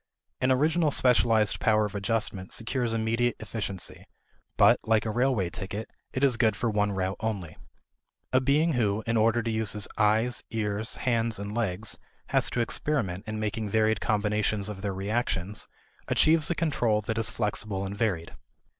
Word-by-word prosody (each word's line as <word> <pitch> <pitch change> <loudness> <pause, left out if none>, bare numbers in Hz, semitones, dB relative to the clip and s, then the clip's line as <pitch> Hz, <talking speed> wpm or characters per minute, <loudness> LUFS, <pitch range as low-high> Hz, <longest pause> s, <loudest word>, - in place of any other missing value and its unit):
An 130 - +2
original 155 +4 +3
specialized 115 -6 +3
power 110 -1 +3
of 105 - -5
adjustment 100 -2 -2
secures 120 +1 -1
immediate 115 +1 0
efficiency, 105 -4 -6 0.5
but, - - +6
like 110 0 +2
a 110 - -1
railway 120 -6 +1
ticket, 100 +5 -6 0.2
it 130 - -2
is 130 -3 +3
good 110 -3 +3
for 115 -2 -1
one 105 -1 +1
route 95 0 -2
only. 100 -7 -3 0.8
A 130 - +5
being 150 +5 +2
who, 110 -3 0
in 115 - 0
order 115 +1 +3
to 115 - -1
use 110 -2 -1
his 105 -2 -1
eyes, 110 +3 +2
ears, 110 -1 -2
hands, 115 -2 0
and 100 +1 -5
legs, 105 -3 -1 0.3
has - - +2
to 120 - -1
experiment 115 -7 -1
in 110 0 -4
making 110 0 -2
varied 110 0 +2
combinations 105 -1 0
of 100 -2 -7
their 100 0 -2
reactions, 100 0 -2 0.4
achieves 155 -1 +3
a 170 - 0
control 120 -10 +1
that 110 +2 -2
is 110 -3 +2
flexible 100 -1 -2
and 100 +1 -5
varied. 95 -7 -1
110 Hz, 165 wpm, -27 LUFS, 100-120 Hz, 0.8 s, but